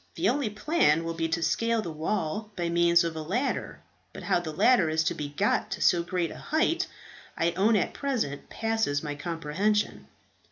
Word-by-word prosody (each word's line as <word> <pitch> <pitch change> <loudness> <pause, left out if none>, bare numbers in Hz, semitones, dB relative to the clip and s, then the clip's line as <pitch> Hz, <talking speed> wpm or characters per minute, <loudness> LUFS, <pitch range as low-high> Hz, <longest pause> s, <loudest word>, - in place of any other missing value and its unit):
The 180 +4 +2
only 265 -2 0
plan 210 - +2
will 165 0 -3
be 165 0 -1
to 165 +1 -1
scale 230 +4 +1
the 170 - -5
wall 190 +5 -2
by 170 -1 -2
means 170 0 +4
of 165 -1 -3
a 160 - -4
ladder; 230 - -2 0.3
but - - -9
how - - +2
the 165 -3 -5
ladder 185 +1 +4
is 160 +1 +1
to - - 0
be 145 -1 -5
got 195 +8 0
to - - -4
so 175 - +4
great 175 -1 -2
a - - -9
height, 330 +4 0 0.5
I 170 +1 +2
own 200 +6 +3
at 200 - 0
present 235 - -3
passes 220 -11 -1
my 150 -1 -3
comprehension." 170 +7 -1
175 Hz, 195 wpm, -27 LUFS, 160-220 Hz, 0.5 s, means